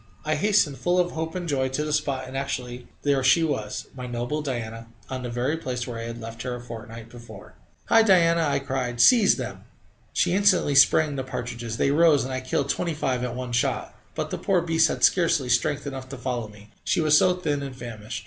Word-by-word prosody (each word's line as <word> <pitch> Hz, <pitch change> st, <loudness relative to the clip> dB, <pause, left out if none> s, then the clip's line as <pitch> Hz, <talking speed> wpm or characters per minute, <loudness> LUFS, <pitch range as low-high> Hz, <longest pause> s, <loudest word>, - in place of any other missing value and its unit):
I 155 Hz, -, +1 dB
hastened, 155 Hz, -5 st, +2 dB
full 175 Hz, +6 st, +1 dB
of 175 Hz, -1 st, +2 dB
hope 160 Hz, +2 st, -4 dB
and 180 Hz, -1 st, -4 dB
joy, 135 Hz, -3 st, 0 dB
to 130 Hz, +3 st, -2 dB
the 150 Hz, -, -2 dB
spot, 140 Hz, -3 st, -1 dB
and 130 Hz, -, -9 dB
actually 125 Hz, -2 st, -4 dB, 0.2 s
there 140 Hz, -2 st, +2 dB
she 150 Hz, +6 st, +4 dB
was! 110 Hz, -9 st, -3 dB
my 125 Hz, -1 st, -6 dB
noble 120 Hz, +5 st, -3 dB
Diana 115 Hz, -5 st, -5 dB, 0.2 s
on 130 Hz, -1 st, -3 dB
the 125 Hz, -, -5 dB
very 125 Hz, +6 st, -1 dB
place 125 Hz, -5 st, -4 dB
where 120 Hz, -2 st, -6 dB
I 115 Hz, -, -5 dB
had 115 Hz, 0 st, -6 dB
left 115 Hz, 0 st, -8 dB
her 125 Hz, -1 st, -3 dB
a -, -, -7 dB
fortnight 115 Hz, -1 st, -9 dB
before. 115 Hz, -4 st, -12 dB, 0.3 s
"Hi, 225 Hz, -, +5 dB
Diana!" 170 Hz, -5 st, +4 dB
I 150 Hz, -3 st, +1 dB
cried. 130 Hz, -3 st, -3 dB
"Seize 225 Hz, -, +6 dB
them!" -, -, -6 dB, 0.5 s
She -, -, +1 dB
instantly 190 Hz, -6 st, +3 dB
sprang 145 Hz, +1 st, +4 dB
the 130 Hz, -, -2 dB
partridges; 120 Hz, -3 st, -5 dB
they 140 Hz, -, +2 dB
rose, 155 Hz, -1 st, +4 dB
and 130 Hz, +1 st, -5 dB
I 130 Hz, -, -2 dB
killed 135 Hz, +2 st, -2 dB
twenty 170 Hz, +1 st, -1 dB
five 130 Hz, -4 st, -1 dB
at 125 Hz, -1 st, -3 dB
one 125 Hz, -1 st, -5 dB
shot. 120 Hz, +1 st, -1 dB, 0.2 s
But -, -, -3 dB
the -, -, -3 dB
poor 185 Hz, -3 st, +1 dB
beast 165 Hz, -1 st, +3 dB
had -, -, -4 dB
scarcely 165 Hz, -7 st, +3 dB
strength 140 Hz, +4 st, +1 dB
enough 135 Hz, -2 st, -6 dB
to 135 Hz, -, -7 dB
follow 125 Hz, -3 st, -3 dB
me, 105 Hz, 0 st, -16 dB
she -, -, +1 dB
was 155 Hz, -2 st, +4 dB
so 180 Hz, +3 st, +4 dB
thin 150 Hz, -6 st, -2 dB
and 135 Hz, -2 st, -6 dB
famished. 115 Hz, -4 st, -7 dB
130 Hz, 225 wpm, -25 LUFS, 120-155 Hz, 0.5 s, Seize